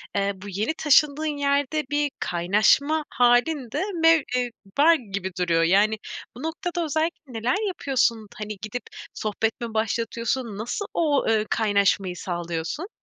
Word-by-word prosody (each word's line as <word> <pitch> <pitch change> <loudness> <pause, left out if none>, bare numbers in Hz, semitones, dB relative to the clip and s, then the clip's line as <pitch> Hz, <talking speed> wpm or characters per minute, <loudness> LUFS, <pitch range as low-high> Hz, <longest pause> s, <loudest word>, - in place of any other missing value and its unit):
eee, 200 0 +1
bu 195 +2 -10
yeni 205 - -1
taşındığın 300 0 +3
yerde 285 +2 +1
bir 290 -1 0
kaynaşma 210 - +2
hâlin 245 +2 +2
de 295 +8 -1 0.2
mev 325 -1 +6
eee, 250 -1 0 0.3
var 320 +4 +7
gibi 200 - -5
duruyor. 170 -2 +2
Yani 205 +6 +3 0.4
bu 250 - -9
noktada 345 +2 -3
özellikle 315 -2 -2
neler 250 - 0
yapıyorsun? 255 - 0
Hani 210 -1 -6
gidip 215 +3 -5 0.3
sohbet 215 +2 -2
mi 230 -2 -4
başlatıyorsun? 230 +1 -2
Nasıl 240 - -3
o, 300 -4 +1
eee, 215 -1 +2
kaynaşmayı 200 -3 +1
sağlıyorsun? 175 - -4
235 Hz, 140 wpm, -24 LUFS, 205-295 Hz, 0.4 s, var